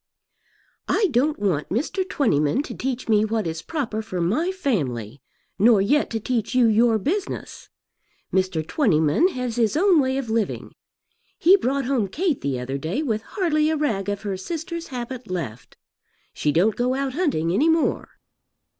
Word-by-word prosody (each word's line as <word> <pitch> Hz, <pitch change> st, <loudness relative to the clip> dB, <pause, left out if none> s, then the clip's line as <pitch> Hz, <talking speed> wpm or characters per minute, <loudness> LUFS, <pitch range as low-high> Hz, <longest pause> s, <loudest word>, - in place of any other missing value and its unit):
"I 410 Hz, -4 st, +2 dB
don't 280 Hz, +5 st, +2 dB
want 185 Hz, -8 st, -1 dB
Mr. 315 Hz, -, -1 dB
Twentyman 185 Hz, -, +1 dB
to -, -, -7 dB
teach 260 Hz, -1 st, -4 dB
me 215 Hz, -2 st, +4 dB
what 220 Hz, -1 st, -1 dB
is 160 Hz, 0 st, -4 dB
proper 255 Hz, -9 st, -3 dB
for 185 Hz, -5 st, -5 dB
my 235 Hz, -, +1 dB
family, 140 Hz, -, -2 dB, 0.4 s
nor 220 Hz, +1 st, +6 dB
yet 280 Hz, +10 st, +2 dB
to 225 Hz, -, -2 dB
teach 230 Hz, +1 st, -2 dB
you 250 Hz, -2 st, +5 dB
your 225 Hz, +1 st, +4 dB
business. 365 Hz, -, -4 dB, 0.6 s
Mr. 185 Hz, -4 st, 0 dB
Twentyman 180 Hz, -, +3 dB
has 250 Hz, -9 st, -4 dB
his 230 Hz, +3 st, +2 dB
own 370 Hz, -1 st, +5 dB
way 265 Hz, -1 st, +1 dB
of 270 Hz, -3 st, -3 dB
living. 225 Hz, -2 st, -2 dB, 0.6 s
He 365 Hz, +4 st, +6 dB
brought 275 Hz, -6 st, 0 dB
home 250 Hz, -6 st, 0 dB
Kate 315 Hz, -, -1 dB
the 135 Hz, -3 st, -2 dB
other 135 Hz, +2 st, -4 dB
day 180 Hz, -, -2 dB
with 220 Hz, -6 st, -1 dB
hardly 310 Hz, -, 0 dB
a 315 Hz, -, 0 dB
rag 215 Hz, -10 st, -1 dB
of 205 Hz, 0 st, -3 dB
her 200 Hz, -2 st, -3 dB
sister's 335 Hz, -, -5 dB
habit 250 Hz, -1 st, -6 dB
left. 135 Hz, -11 st, -6 dB, 0.6 s
She 150 Hz, -, 0 dB
don't 195 Hz, +7 st, +2 dB
go 250 Hz, +1 st, 0 dB
out 270 Hz, -1 st, -2 dB
hunting 260 Hz, -, 0 dB
any 295 Hz, -, +3 dB
more." 325 Hz, 0 st, +1 dB
235 Hz, 165 wpm, -23 LUFS, 190-295 Hz, 0.6 s, nor